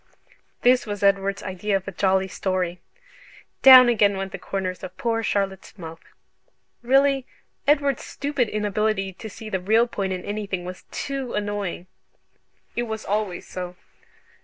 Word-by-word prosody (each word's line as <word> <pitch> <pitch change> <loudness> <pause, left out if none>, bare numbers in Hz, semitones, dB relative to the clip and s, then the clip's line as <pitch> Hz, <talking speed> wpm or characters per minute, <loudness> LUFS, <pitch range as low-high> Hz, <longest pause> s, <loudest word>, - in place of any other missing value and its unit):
This 250 -1 +4
was 205 -1 -4
Edward's 200 0 +2
idea 190 +2 -2
of 190 - -10
a - - -3
jolly 190 0 +1
story! 185 -2 -2 0.8
Down 255 -2 +10
again 205 -4 +3
went 195 0 -4
the - - -6
corners 185 -2 -4
of 185 0 -9
poor 230 -1 0
Charlotte's 195 -1 -2
mouth. 165 -2 -8 0.8
Really 270 +1 +3 0.4
Edward's 280 -2 +2
stupid 280 -5 -2
inability 210 -1 -1
to 220 +4 -9
see 220 +2 -10
the 190 -3 -1
real 220 +6 +3
point 200 -5 -3
in 185 -1 -4
anything 200 -3 -3
was 180 0 -8
TOO 275 -3 -4
annoying! 205 -4 -3 0.9
It 240 0 -1
was 220 0 -5
always 205 -3 -2
so. 180 -1 -6
205 Hz, 145 wpm, -24 LUFS, 190-230 Hz, 0.9 s, Down